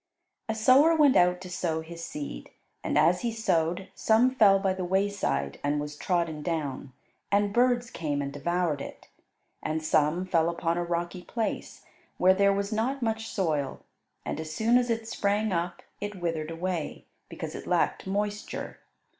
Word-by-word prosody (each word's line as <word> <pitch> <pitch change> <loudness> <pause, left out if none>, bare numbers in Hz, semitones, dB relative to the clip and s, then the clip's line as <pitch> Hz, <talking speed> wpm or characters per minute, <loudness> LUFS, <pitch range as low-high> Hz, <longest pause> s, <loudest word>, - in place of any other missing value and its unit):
A 220 - 0
sower 265 +9 +6
went 295 -4 +5
out 180 0 +4
to 185 - -8
sow 165 -2 -1
his 165 +1 -9
seed, 145 - -6 0.3
and - - 0
as 180 +1 +4
he 235 - -1
sowed 180 -5 0
some 230 +4 +3
fell 205 -6 +6
by 195 -1 +1
the 185 0 -4
wayside 185 - 0
and 145 +1 +1
was 150 0 -5
trodden 165 -2 -1
down, 145 -5 -3 0.4
and 200 0 +2
birds 245 0 +2
came 150 -3 -2
and 140 0 -3
devoured 165 0 -1
it. - - -9 0.5
And 155 0 -2
some 155 +3 +2
fell 170 -3 +2
upon 170 0 -1
a - - 0
rocky 175 +1 -3
place, 225 +4 -4 0.3
where 185 +1 +5
there 200 +1 +4
was 200 +2 -1
not 250 +5 -1
much 225 -1 -1
soil, 155 -8 -1 0.4
and - - -3
as 160 -1 -5
soon 230 +8 +3
as 245 -1 -1
it 225 -1 -1
sprang 210 0 0
up 175 0 -2 0.2
it 205 -2 -5
withered 165 -3 -2
away, 165 -1 -3 0.2
because - - -6
it - - -8
lacked - - +1
moisture. 205 +2 -3
180 Hz, 170 wpm, -28 LUFS, 160-215 Hz, 0.5 s, sower